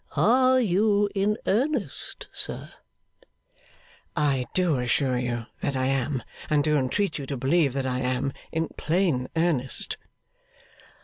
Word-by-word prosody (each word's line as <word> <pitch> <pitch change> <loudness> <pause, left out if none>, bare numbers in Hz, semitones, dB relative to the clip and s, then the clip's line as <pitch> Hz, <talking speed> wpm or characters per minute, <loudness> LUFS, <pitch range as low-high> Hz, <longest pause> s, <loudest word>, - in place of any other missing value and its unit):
Are 255 +3 +5
you 205 -1 +3
in 205 +2 +1
earnest, 240 - 0
sir?' - - -4 1.4
'I 135 -4 +1
do 175 -7 +2
assure 125 +1 +1
you 120 -2 -2
that 140 - -2
I 130 0 0
am, 135 -1 0 0.3
and 150 -1 +3
do 150 0 +2
entreat 150 +7 0
you 140 - -6
to 140 - -3
believe 140 +2 +2
that 135 -1 -2
I 125 -1 -1
am, 130 +1 -1 0.2
in 160 -1 -1
plain 160 -6 0
earnest. 160 -6 0
145 Hz, 130 wpm, -26 LUFS, 130-195 Hz, 1.4 s, Are